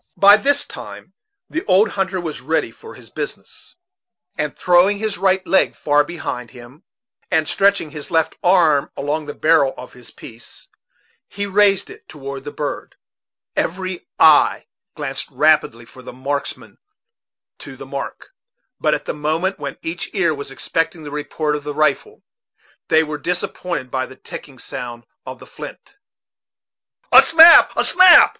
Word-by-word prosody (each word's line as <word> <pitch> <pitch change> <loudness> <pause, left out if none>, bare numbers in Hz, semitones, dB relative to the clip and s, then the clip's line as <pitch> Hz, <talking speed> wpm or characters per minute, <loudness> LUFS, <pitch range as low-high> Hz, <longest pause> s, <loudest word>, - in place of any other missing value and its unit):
By 200 +1 +8
this 280 +6 +1
time - - -11 0.3
the 320 - -4
old 200 +3 +3
hunter 190 -1 -2
was 160 -6 -6
ready 155 -3 -1
for - - -14
his - - -16
business, - - -8 0.6
and 150 -1 -4
throwing 180 +4 +3
his 215 -2 -4
right 190 -1 +1
leg 190 - +2
far 145 0 +2
behind 145 -7 -6
him, 125 +6 -15 0.5
and 160 -3 +1
stretching 195 -6 +1
his 150 -1 -8
left 160 -1 0
arm 170 -6 +3
along 150 +2 -3
the 145 - -7
barrel 155 -4 +2
of 125 - -11
his 125 -2 -13
piece, 115 +1 -12 0.6
he 200 0 -5
raised 200 -1 +2
it - - -16
toward 140 -2 -8
the 145 - -6
bird, 145 0 -6 0.6
Every 185 +1 -3
eye - - +5 0.3
glanced - - -5
rapidly 140 -5 +1
from 130 +2 -16
the - - -9
marks 140 +3 -3
man - - -18 0.8
to - - -11
the - - -10
mark; - - -7 0.5
but 155 - +1
at - - -7
the - - -3
moment 160 +6 -2
when 140 -1 -6
each 165 +2 -5
ear 170 -5 +1
was 140 -2 -8
expecting 165 +4 -3
the 145 - -8
report 150 +1 -3
of 145 - -6
the 145 0 -6
rifle, 155 - -1 0.6
they 160 0 +3
were 150 -1 -6
disappointed 175 -4 -4
by 130 -1 -2
the 130 - -14
ticking 135 0 -11
sound 120 -1 -8 0.2
of - - -7
the - - -14
flint. 410 - -12 1.1
"A - - +10
snap, 330 +1 +8
a - - +3
snap!" 370 -1 +7
155 Hz, 160 wpm, -19 LUFS, 145-190 Hz, 1.1 s, A